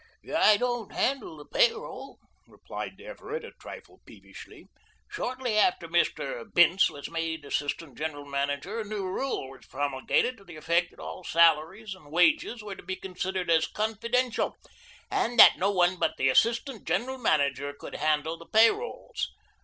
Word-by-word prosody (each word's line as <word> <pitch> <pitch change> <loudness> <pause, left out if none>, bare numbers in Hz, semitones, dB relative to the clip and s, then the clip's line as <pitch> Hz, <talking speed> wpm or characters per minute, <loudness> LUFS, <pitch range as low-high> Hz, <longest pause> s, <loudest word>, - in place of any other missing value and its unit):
"I 210 -1 +6
don't 240 -2 -2
handle 260 - -1
the 145 - -11
pay - - +4
roll," 460 +1 -9 0.3
replied - - -8
Everett 480 -1 -7
a - - -10
trifle - - -12
peevishly. - - -14 0.4
"Shortly 255 - -1
after 370 - +2
Mr. - - 0
Bince 175 +2 +5
was 145 - -8
made 165 -2 -3
assistant 145 -1 -3
general 150 -2 -4
manager 145 +9 -2
a - - -2
new 210 -2 -4
rule 185 - -3
was 135 - -15
promulgated, 145 - 0
to 200 - -17
the 175 -4 -12
effect 170 +3 +1
that - - -21
all 185 - -8
salaries 170 +6 +2
and 155 -6 -16
wages 235 - +2
were 205 -2 -6
to - - -12
be 190 +1 -4
considered 185 -1 -3
as 160 -1 +4
confidential 230 +3 -1 0.6
and 240 +1 0
that - - +9
no 195 - +2
one 180 -2 +2
but - - 0
the 135 - +2
assistant 230 - +1
general 260 +2 -1
manager 145 - +1
would - - -9
handle 155 +1 0
the 170 - -14
pay 225 +1 +7
rolls. 465 +3 -5
190 Hz, 160 wpm, -28 LUFS, 155-240 Hz, 0.6 s, that